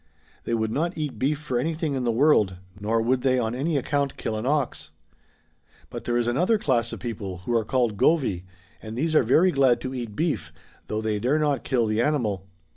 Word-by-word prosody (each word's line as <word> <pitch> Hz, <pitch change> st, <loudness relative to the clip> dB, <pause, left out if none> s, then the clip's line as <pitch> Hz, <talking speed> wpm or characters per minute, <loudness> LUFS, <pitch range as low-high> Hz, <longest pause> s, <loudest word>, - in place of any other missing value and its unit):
They 115 Hz, -, 0 dB
would 110 Hz, -1 st, -1 dB
not 165 Hz, +8 st, -1 dB
eat 150 Hz, -3 st, -4 dB
beef 145 Hz, +3 st, +1 dB
for 130 Hz, -5 st, -2 dB
anything 160 Hz, +2 st, -1 dB
in 130 Hz, -2 st, -2 dB
the 120 Hz, -, +2 dB
world, 115 Hz, -7 st, +3 dB, 0.2 s
nor 110 Hz, +2 st, 0 dB
would 125 Hz, +2 st, +1 dB
they 130 Hz, 0 st, +2 dB
on 115 Hz, -2 st, 0 dB
any 145 Hz, +5 st, 0 dB
account 140 Hz, +1 st, -1 dB
kill 110 Hz, -, -3 dB
an 110 Hz, +3 st, -3 dB
ox. 145 Hz, -3 st, -1 dB, 1.0 s
But -, -, -7 dB
there 120 Hz, 0 st, +1 dB
is 120 Hz, -1 st, 0 dB
another 180 Hz, -, +2 dB
class 120 Hz, -, 0 dB
of -, -, -6 dB
people 100 Hz, -7 st, -6 dB
who 120 Hz, -, -1 dB
are 115 Hz, -, +2 dB
called 120 Hz, -2 st, 0 dB
Govy^ 130 Hz, -, +2 dB, 0.4 s
and 110 Hz, +1 st, -7 dB
these 160 Hz, +4 st, 0 dB
are 155 Hz, -, +6 dB
very 155 Hz, +10 st, +4 dB
glad 130 Hz, -5 st, +3 dB
to 130 Hz, +1 st, -4 dB
eat 120 Hz, -5 st, -5 dB
beef, 160 Hz, -1 st, -1 dB, 0.4 s
though 110 Hz, 0 st, -2 dB
they 110 Hz, -1 st, -1 dB
dare 130 Hz, +8 st, +1 dB
not 150 Hz, -3 st, 0 dB
kill 125 Hz, -4 st, +1 dB
the 110 Hz, +1 st, +1 dB
animal. 110 Hz, -10 st, 0 dB
125 Hz, 210 wpm, -25 LUFS, 110-150 Hz, 1.0 s, are